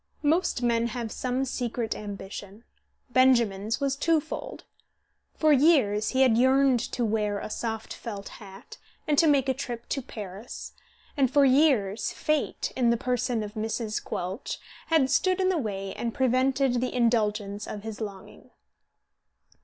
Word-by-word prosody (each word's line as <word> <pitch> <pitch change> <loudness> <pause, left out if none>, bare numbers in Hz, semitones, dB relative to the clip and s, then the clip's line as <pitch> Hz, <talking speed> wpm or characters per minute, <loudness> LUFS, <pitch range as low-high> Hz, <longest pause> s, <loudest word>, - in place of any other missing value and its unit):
Most 310 -4 +1
men 235 -1 +2
have 235 -1 -4
some 255 +1 -1
secret 240 -3 -3
ambition; 200 +1 -8 0.5
Benjamin's 230 -5 +3
was 275 -1 0
twofold. 315 +1 -1 0.7
For 310 -1 +4
years 260 -8 +4
he 265 - +1
had 235 -3 +4
yearned 260 0 +4
to 240 - 0
wear 210 -2 0
a 210 - -6
soft 225 -1 -4
felt 205 -3 -7
hat 195 -1 -12 0.3
and 300 - +3
to 330 - +5
make 280 -3 +3
a 265 - +2
trip 240 -2 -6
to 275 - -1
Paris, 210 -1 -8 0.4
and 270 -4 +3
for 285 +1 +4
years 255 -7 +3
Fate, 305 -1 -1
in 245 -2 +2
the 235 - +3
person 245 -1 -1
of 210 0 -7
Mrs. 220 0 -3
Quelch, 185 +6 -4 0.3
had 310 -5 +3
stood 370 0 +2
in 375 0 +2
the 365 -3 +1
way 195 -5 -4
and 235 -1 -4
prevented 260 -1 +2
the 255 - -2
indulgence 210 -4 0
of 205 - -6
his 220 0 -7
longing. 200 -3 -8
240 Hz, 150 wpm, -27 LUFS, 210-270 Hz, 0.7 s, to